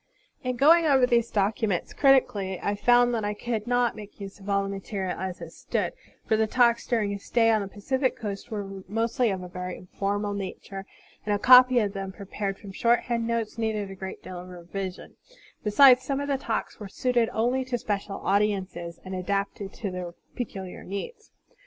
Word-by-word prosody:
In 255 -1 -1
going 320 +6 +6
over 265 -3 +5
these 235 -2 +2
documents 200 -2 0
critically, 205 -9 +3
I 205 - -1
fotmd 245 +3 +4
that 230 -3 -1
I 205 0 -1
could 225 0 -3
not 245 -1 +2
make 210 0 -11
use 200 0 -8
of 200 +1 -9
all 200 0 +2
the 195 - -4
material 195 -1 -4
as 185 -1 -5
it 165 -1 -8
stood; - - -2 0.3
for 220 - +2
the 220 0 +2
talks 235 0 +3
during 220 -5 +1
his 200 0 -5
stay 225 -1 +3
on 215 -1 +3
the 200 - -4
Pacific 260 +7 -1
coast 205 0 -5
were 195 -3 -5
mostly 225 +3 +1
of 190 -2 -3
a - - -6
very 180 0 -6
informal 205 +2 -2
nature, 195 0 -6 0.4
and 210 -1 +1
a - - +1
copy 255 +2 +8
of 205 -4 +2
them 195 -1 -4
prepared 195 0 -4
from 200 - -10
shorthand 235 +2 +1
notes 230 -1 -2
needed 215 -3 -1
a - - -8
great 190 0 -7
deal 180 -1 -7
of 180 +1 -10
revision; 180 +1 -7 0.5
besides, 250 +4 +7
some 270 +1 -2
of 285 - -3
the 280 -1 +1
talks 225 -4 -3
were 205 -2 -7
suited 240 +2 +1
only 245 +4 +1
to 255 -1 -2
special 200 -3 -3
audiences 190 -4 0
and 185 - -6
adapted 195 +1 -2
to 205 -3 -5
their 180 -1 -5 0.2
peculiar 195 -7 -6
needs. 425 - -6
205 Hz, 195 wpm, -26 LUFS, 195-240 Hz, 0.5 s, copy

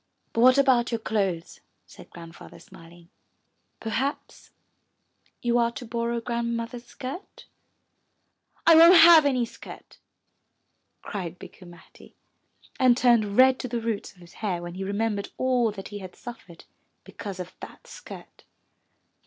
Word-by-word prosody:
But 230 - 0
what 255 +2 +6
about 255 -4 +3
your 230 - 0
clothes?' 195 -6 -3
' - - -48
said - - -15
Grandfather, 165 -1 -13
smiling. 170 +1 -17 0.7
'Terhaps 265 +6 -4 0.9
you 240 0 +2
are 235 0 +1
to 250 - -8
borrow 235 0 -2
Grand 235 0 -3
mother's 235 +1 -7
skirt?" 275 +10 -9 1.2
I 335 - +7
won't 335 +3 +8
have 330 -3 +8
any 255 -3 +1
skirt," - - -13 1.0
cried 180 -4 -6
Bikku 180 - -14
Matti, 175 0 -17 0.6
and 250 -2 +4
turned 230 -5 +2
red 260 0 +5
to 255 - -4
the 240 -1 -3
roots 225 -2 -4
of 180 - -22
his 175 0 -16
hair 180 -5 -2
when 175 0 -7
he 190 +2 -6
remem 205 +2 -2
bered 200 - -7
all 250 -3 +1
that 195 -2 -9
he 205 -1 -7
had 185 -2 -10
suffer 235 -7 -11
ed 165 - -17 0.4
because 195 -3 -9
of 180 0 -7
that - - -12
skirt. - - -13
230 Hz, 150 wpm, -25 LUFS, 195-250 Hz, 1.2 s, won't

